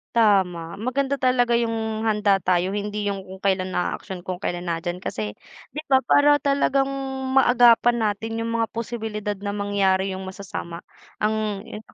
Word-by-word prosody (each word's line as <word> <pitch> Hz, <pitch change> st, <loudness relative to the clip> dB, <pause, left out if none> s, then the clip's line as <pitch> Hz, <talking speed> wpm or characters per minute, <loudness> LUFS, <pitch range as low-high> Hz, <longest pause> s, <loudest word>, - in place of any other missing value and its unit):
Tama, 185 Hz, -7 st, +2 dB
maganda 270 Hz, +3 st, -1 dB
talaga 245 Hz, -2 st, +3 dB
'yong 225 Hz, -2 st, -1 dB
handa 210 Hz, -3 st, +2 dB
tayo, 180 Hz, +1 st, +1 dB
hindi 205 Hz, 0 st, -3 dB
'yong 200 Hz, -1 st, -2 dB
kung 190 Hz, -, -8 dB
kailan 185 Hz, -1 st, 0 dB
aaksyon 180 Hz, 0 st, -4 dB
kung 185 Hz, 0 st, -5 dB
kailan 175 Hz, -2 st, -3 dB
na 165 Hz, -1 st, -2 dB
diyan 175 Hz, 0 st, -3 dB
kasi, 110 Hz, -, -5 dB, 0.3 s
'di 300 Hz, -, -6 dB
ba, 265 Hz, -3 st, +4 dB
para 290 Hz, +1 st, +4 dB
talagang 275 Hz, -1 st, +2 dB, 0.5 s
maagapan 240 Hz, -1 st, +5 dB
natin 225 Hz, +2 st, -4 dB
'yong 230 Hz, -, -2 dB
mga 230 Hz, 0 st, 0 dB
posibilidad 220 Hz, -3 st, -4 dB
na 200 Hz, +1 st, -4 dB
mangyari 200 Hz, -2 st, +1 dB
'yong 190 Hz, 0 st, -5 dB
masasama, 185 Hz, -3 st, -7 dB, 0.4 s
ang 215 Hz, -2 st, 0 dB
'yon 215 Hz, +2 st, -10 dB
nga, -, -, -21 dB
210 Hz, 160 wpm, -23 LUFS, 190-235 Hz, 0.5 s, maagapan